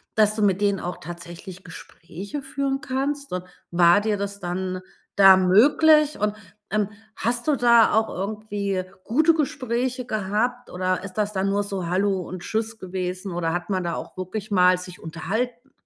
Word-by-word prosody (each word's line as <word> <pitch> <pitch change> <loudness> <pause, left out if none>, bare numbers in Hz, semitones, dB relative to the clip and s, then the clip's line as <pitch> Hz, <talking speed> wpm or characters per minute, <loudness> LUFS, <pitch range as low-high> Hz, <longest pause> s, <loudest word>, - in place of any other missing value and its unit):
dass 215 -1 +4
du 215 - -2
mit 200 -1 +2
denen 200 -1 +2
auch 180 - -5
tatsächlich 175 +2 -9
Gespräche 185 - -8
führen 275 0 -2
kannst? 280 -1 -2
Und 180 0 -3 0.3
war 175 +3 +5
dir 210 -1 0
das 200 0 -4
dann 185 +1 -3 0.3
da 195 -1 +8
möglich? 295 - +5
Und, 210 0 0 0.4
ähm, 210 -1 +1 0.3
hast 240 +3 -1
du 295 - +4
da 235 -2 +5
auch 220 +1 +2
irgendwie 200 -1 -3 0.2
gute 310 +8 +4
Gespräche 255 -4 -1
gehabt 220 +3 -1
oder 185 +1 -1
ist 185 - -8
das 210 0 -1
dann 195 +1 0
nur 205 +1 +1
so:, 195 -4 -4
Hallo 190 +2 +1
und 185 -1 -7
Tschüss 220 +2 -3
gewesen" 185 +1 -4
oder 165 -1 -1
hat 175 +2 -3
man 185 -2 0
da 170 - -2
auch - - -8
wirklich 205 +4 -5
mal 180 -1 +5
sich 180 0 -9
unterhalten? 230 +11 -4
200 Hz, 170 wpm, -24 LUFS, 185-235 Hz, 0.4 s, da